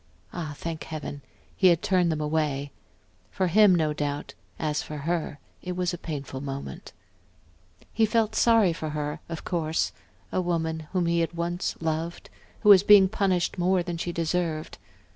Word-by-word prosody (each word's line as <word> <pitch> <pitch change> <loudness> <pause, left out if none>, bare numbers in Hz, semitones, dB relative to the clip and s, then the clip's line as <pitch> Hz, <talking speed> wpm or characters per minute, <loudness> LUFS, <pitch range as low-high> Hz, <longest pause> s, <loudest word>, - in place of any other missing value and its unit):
Ah, 155 -4 -5
thank 165 -1 -5
Heaven, 150 -2 -6 0.3
he 190 - +4
had 170 -2 +4
turned 180 -3 +2
them 155 - -2
away; 150 -2 -1 0.6
for 190 - -1
him, 195 +1 +6
no 155 -3 +1
doubt, 145 0 -3 0.2
as 150 -1 -1
for 150 - -7
her 160 0 -2 0.2
it 180 - -4
was 180 0 -1
a - - -3
painful 140 -5 -5
moment. 135 - -6 1.0
He 220 0 +3
felt 220 0 +1
sorry 225 -7 +4
for 160 -1 -5
her, 150 +1 -3
of 165 -2 -5
course 160 -2 0 0.4
a - - 0
woman 160 -3 -2
whom 185 -2 +1
he 170 0 +2
had 165 - +1
loved 175 +1 -2
once, 165 +1 -2 0.4
who 210 - +4
was 195 -3 +10
being 200 -2 +7
punished 190 -3 0
more 180 0 +2
than 170 -1 -4
she 175 - -2
deserved. 165 -1 -2
170 Hz, 165 wpm, -26 LUFS, 155-180 Hz, 1.0 s, was